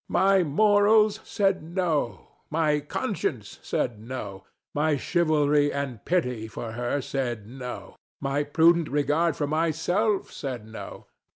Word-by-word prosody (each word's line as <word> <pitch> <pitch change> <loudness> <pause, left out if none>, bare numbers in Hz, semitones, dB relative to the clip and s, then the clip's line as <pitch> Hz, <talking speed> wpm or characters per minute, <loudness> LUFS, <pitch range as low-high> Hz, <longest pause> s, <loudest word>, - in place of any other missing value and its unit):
My 195 0 +4
morals 210 +5 +4
said 195 -2 +1
No. 160 - -2 0.2
My 155 -1 +2
conscience 145 - -3
said 115 -4 -2
No. 110 -4 -7 0.3
My 150 0 +1
chivalry 150 -3 +2
and 135 -6 -4
pity 125 -11 0
for 110 +1 -6
her 120 +4 -2
said 120 -6 -3
No. 125 +2 -8 0.2
My 140 +1 0
prudent 165 +2 +3
regard 150 +3 +1
for 145 - -1
myself 165 +7 0
said 125 -6 -5
No. 110 0 -9
150 Hz, 120 wpm, -26 LUFS, 125-170 Hz, 0.3 s, My